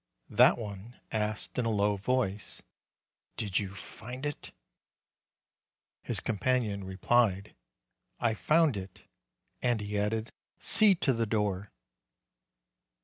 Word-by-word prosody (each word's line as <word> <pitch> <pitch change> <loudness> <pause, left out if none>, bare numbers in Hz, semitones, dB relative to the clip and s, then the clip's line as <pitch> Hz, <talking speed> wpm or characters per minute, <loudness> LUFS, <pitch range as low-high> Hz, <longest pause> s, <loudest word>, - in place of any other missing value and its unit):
That - - +6
one 105 +1 -8
asked 110 +2 -2
in 125 - 0
a - - +1
low 105 -1 +2
voice, 105 -1 -2 0.7
"Did 100 -4 0
you 100 -2 -5
find 125 +7 -8
it?" 145 -1 -5 1.5
His - - -2
companion 110 -2 0
replied, 100 +1 +1 0.7
"I 115 -2 +1
found 150 +2 +3
it." 95 0 -9 0.6
And 120 -2 +1
he 105 0 -3
added, 110 +2 -1 0.3
"See 215 -3 +6
to 145 -5 +1
the 115 -1 -1
door." 105 -2 -1
110 Hz, 110 wpm, -30 LUFS, 100-120 Hz, 1.5 s, That